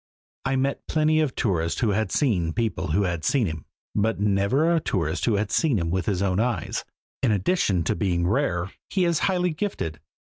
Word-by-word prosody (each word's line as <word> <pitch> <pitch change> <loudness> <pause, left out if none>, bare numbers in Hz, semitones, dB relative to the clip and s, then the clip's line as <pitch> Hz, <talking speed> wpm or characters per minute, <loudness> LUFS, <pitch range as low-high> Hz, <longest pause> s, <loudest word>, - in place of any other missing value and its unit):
I 135 0 +1
met 135 +1 -1
plenty 155 0 +2
of 150 -4 0
tourists 85 -6 0
who 115 -4 +2
had 105 -1 0
seen 90 - +1
people 115 -5 -1
who 90 +6 +1
had 85 -4 -2
seen 135 -5 +2
him, 80 -4 -5 0.3
but 110 +1 0
never 105 +11 +2
a 165 - +3
tourist 85 - -1
who 115 - +2
had 100 0 -1
seen 150 -8 +2
him 85 -3 -1
with 95 0 -1
his 100 -2 0
own 95 0 +1
eyes. 115 -7 -1 0.4
In 125 -4 +2
addition 100 - +1
to - - +1
being 85 -4 0
rare, 95 -4 0 0.2
he 185 -2 +1
is 170 -3 +2
highly 180 -1 +1
gifted. 155 - -3
105 Hz, 200 wpm, -25 LUFS, 90-140 Hz, 0.4 s, a